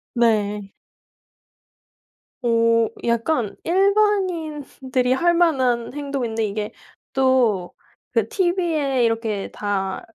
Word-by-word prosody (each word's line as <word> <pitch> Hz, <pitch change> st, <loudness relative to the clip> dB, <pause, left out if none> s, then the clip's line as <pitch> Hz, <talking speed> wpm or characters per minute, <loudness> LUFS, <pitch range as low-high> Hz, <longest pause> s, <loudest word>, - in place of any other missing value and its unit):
네. 210 Hz, -4 st, +1 dB, 1.7 s
어. 230 Hz, -1 st, +3 dB, 0.2 s
약간 235 Hz, 0 st, 0 dB
일반인들이 335 Hz, -10 st, +1 dB
할 345 Hz, +5 st, +3 dB
만한 260 Hz, -9 st, +1 dB
행동인데 265 Hz, -6 st, -2 dB
이게 210 Hz, 0 st, -3 dB
또 250 Hz, -9 st, 0 dB, 0.4 s
그 -, -, +1 dB
티비에 340 Hz, -, +1 dB
이렇게 225 Hz, -3 st, -1 dB
다 195 Hz, -2 st, -3 dB
250 Hz, 160 characters per minute, -22 LUFS, 225-320 Hz, 1.7 s, 어